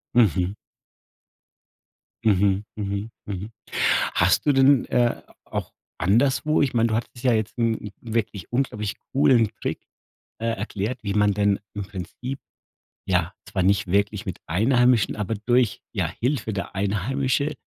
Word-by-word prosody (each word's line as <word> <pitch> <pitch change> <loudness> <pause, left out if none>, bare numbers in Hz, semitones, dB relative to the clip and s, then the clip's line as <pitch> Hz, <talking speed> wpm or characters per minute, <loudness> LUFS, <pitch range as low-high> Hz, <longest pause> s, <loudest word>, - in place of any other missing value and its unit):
Mhm. 95 -4 +3 1.7
Mhm, 100 -1 +3
mhm, 100 +1 -3 0.2
mhm. 100 +2 -5 0.6
Hast - - +3
du 145 - +5
denn, 135 -1 +5
äh, 120 -1 +1 0.2
auch - - -5 0.2
anderswo 130 - +2
ich 140 -3 +1
meine, 115 0 +3
du 110 - 0
hattest 120 +2 -4
ja 125 - +4
jetzt, 110 -1 -1
hm, 115 -1 +2
'n 105 - -8
wirklich 110 -5 -3
unglaublich 115 -5 -1 0.2
coolen 125 -5 +4
Trick, - - -3 0.6
äh, 115 - -2
erklärt, 110 +2 -2
wie 100 -1 -1
man 105 -1 +3
denn 100 -1 +2
im 105 - -4
Prinzip, 110 +7 -6 0.7
ja, 90 0 +1
zwar 95 -2 -1
nicht 100 0 +2
wirklich 100 +2 +1
mit 95 - -5
Einheimischen, 120 +4 +3
aber 105 +1 -2
durch, 120 +2 +1
ja, - - 0
Hilfe 125 -3 -2
der 100 0 -5
Einheimische 130 +9 0
110 Hz, 140 wpm, -24 LUFS, 100-125 Hz, 1.7 s, du